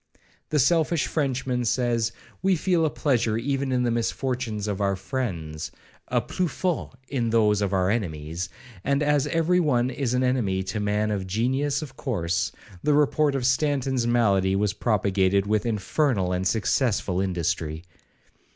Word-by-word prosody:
The 155 - +1
selfish 160 +2 +2
Frenchman1 130 -4 -1
says, 115 -2 +1 0.3
we 190 0 +3
feel 170 -1 +2
a - - 0
pleasure 120 -8 +1
even 135 +2 -1
in 125 -1 +1
the 120 - +1
misfortunes 115 -2 -2
of 100 -1 -2
our 100 -1 +2
friends,'—a 90 -7 -4
plus 180 -2 -2
forte 180 -7 -2
in 120 -4 -1
those 105 -2 +3
of 100 -2 0
our 95 0 +2
enemies; 85 -4 -3 0.3
and 140 +2 +1
as 145 -1 +2
every 165 +3 +2
one 130 -6 +2
is 125 -2 -1
an 125 - +2
enemy 110 -7 +1
to 100 +3 -3
a - - -2
man 105 +1 0
of 95 -2 -2
genius 135 - 0
of 130 -3 -10
course, 85 - -1 0.3
the 150 - +2
report 150 0 +3
of 130 -3 -1
Stanton's 130 -2 +1
malady 100 -5 +3
was 100 0 +1
propagated 100 -3 +1
with 105 +2 0
infernal 110 -2 0
and 90 +1 0
successful 105 -3 +1
industry. 85 -4 -2
115 Hz, 155 wpm, -25 LUFS, 100-135 Hz, 0.3 s, we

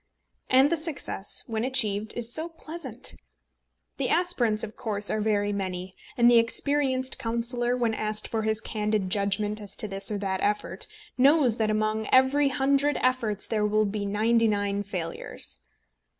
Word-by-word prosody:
And 265 +4 +5
the 335 - +2
success, 305 - 0
when 225 -1 -3
achieved, 220 -5 0
is 240 0 -1
so 320 +2 0
pleasant! 320 -5 -5 0.8
The - - -1
aspirants, 250 -12 +2
of 215 - -6
course, 210 -3 -3
are 215 - -1
very 205 -1 0
many; 185 -2 -4 0.2
and 235 - +3
the 240 -1 +7
experienced 260 +2 0
councillor, 240 +1 -1
when 235 -2 0
asked 215 0 0
for 225 - -2
his 220 0 0
candid 210 -3 -1
judgment 205 +1 0
as 205 - -9
to 215 - -1
this 195 0 -1
or 210 - -2
that 190 -1 -2
effort, 210 +1 -1 0.3
knows 270 -3 +4
that 220 -1 +1
among 215 0 0
every 265 +2 +4
hundred 275 +2 +1
efforts 235 -5 0
there 210 -1 0
will 215 +1 +2
be 200 0 -3
ninety 225 +3 +2
nine 205 -1 0
failures. 175 - -5
220 Hz, 160 wpm, -26 LUFS, 205-255 Hz, 0.8 s, the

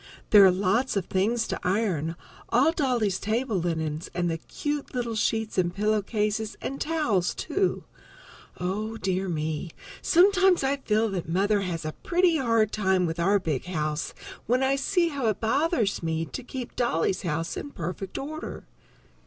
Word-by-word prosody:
There 205 -2 +9
are 190 - +8
lots 200 +6 +1
of 190 - -1
things 225 +5 0
to - - -3
iron, 180 -5 0 0.3
all 270 +7 +4
Dolly's 245 - 0
table 225 0 -1
linen 160 -3 -1
and 175 -1 0
the 165 - -3
cute 290 - -4
little 240 -2 -1
sheets 220 -1 0
and 175 -1 +1
pillow 210 +3 +1
cases 210 +1 -2
and 275 +1 -5
towels, 265 - +1
too. 380 +4 -1 0.8
Oh, 210 +5 -2
dear 190 -1 -1
me! 155 0 -2 0.3
Sometimes 375 -1 +4
I 275 +1 +1
feel 225 -4 +1
that 180 -5 -4
Mother 200 +4 +2
has 170 -4 -3
a 155 - -2
pretty 350 -1 +3
hard 230 -5 +2
time 190 -3 +2
with 165 0 -3
our 195 +4 +4
big 160 -8 -2
house 155 -3 -2 0.3
when 250 +4 +2
I 270 +1 +3
see 340 +5 +1
how 275 -6 -2
it 215 -2 0
bothers 235 - +1
me 165 0 -1
to 260 - -6
keep 250 0 -7
Dolly's 190 -6 +1
house 165 -1 -2
in - - -5
perfect 185 - -5
order. 310 +3 -6
210 Hz, 165 wpm, -26 LUFS, 180-260 Hz, 0.8 s, There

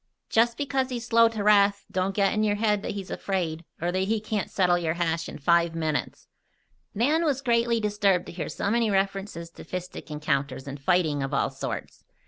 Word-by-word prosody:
Just 235 +1 +3
because 270 -2 -1
he's 240 -2 -4
slow 230 0 +5
to 220 -2 -4
wrath, 200 -1 +4
don't 185 +1 0
you 200 - +3
get 195 - +3
it - - -1
in 215 - +1
your 205 -1 +2
head 210 -1 +1
that - - -4
he's 195 -1 -6
afraid, 170 -4 -2 0.2
or 175 +2 -1
that 185 - -1
he 220 +2 0
can't 215 -1 -3
settle 180 -2 +3
your 165 -1 -1
hash 165 -1 -1
in - - -8
five 170 +3 +2
minutes." 155 -2 -2 0.7
Nan 295 +10 +2
was 280 -4 0
greatly 235 -1 +2
disturbed 205 -4 +1
to - - -8
hear 170 -1 -5
so 200 - -2
many 230 -1 +2
references 195 -3 -1
to - - -12
fistic 180 -2 -7
encounters 140 -3 -2
and 140 +1 -6
fighting 160 -3 +2
of 135 +1 -2
all - - +1
sorts. - - -6
195 Hz, 210 wpm, -26 LUFS, 170-220 Hz, 0.7 s, slow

